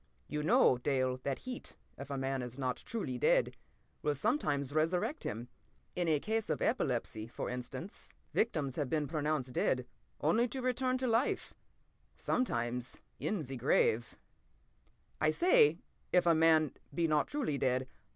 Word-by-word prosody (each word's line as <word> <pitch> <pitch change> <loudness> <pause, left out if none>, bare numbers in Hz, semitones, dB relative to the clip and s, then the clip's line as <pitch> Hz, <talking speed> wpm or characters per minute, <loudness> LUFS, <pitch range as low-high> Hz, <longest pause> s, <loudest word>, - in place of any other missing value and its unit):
You 150 - -2
know, 140 -5 +4
Dale, 130 -1 0
that 140 0 -2
heat, 255 -1 -6 0.2
if 140 0 -9
a 140 - -3
man 135 0 -1
is 125 +1 -6
not 130 -2 -1
truly 130 - -4
dead, - - +3 0.5
will 150 -1 +1
sometimes 145 - 0
resurrect 175 - 0
him. 115 +3 -4 0.5
In 175 -1 0
a 155 -2 +3
case 220 +5 -1
of - - 0
epilepsy, 120 - -1
for 120 - -5
instance, 125 +9 -7 0.2
victims 150 - 0
have 145 -4 -1
been 155 0 +1
pronounced 150 -4 -1
dead 125 0 +1 0.3
only 220 +11 +3
to 260 +2 -5
return 255 0 +1
to 260 - -2
life—sometimes 125 - -2 0.2
in 200 -7 -1
the 135 0 -6
grave. 120 -2 +2 1.1
"I 155 - +4
say 160 - +5 0.3
'if 180 - +4
a 170 - +6
man 160 -2 +4 0.2
be 165 +3 +1
not 150 -2 +2
truly 245 - -1
dead.' 130 0 +1
150 Hz, 150 wpm, -33 LUFS, 130-180 Hz, 1.1 s, a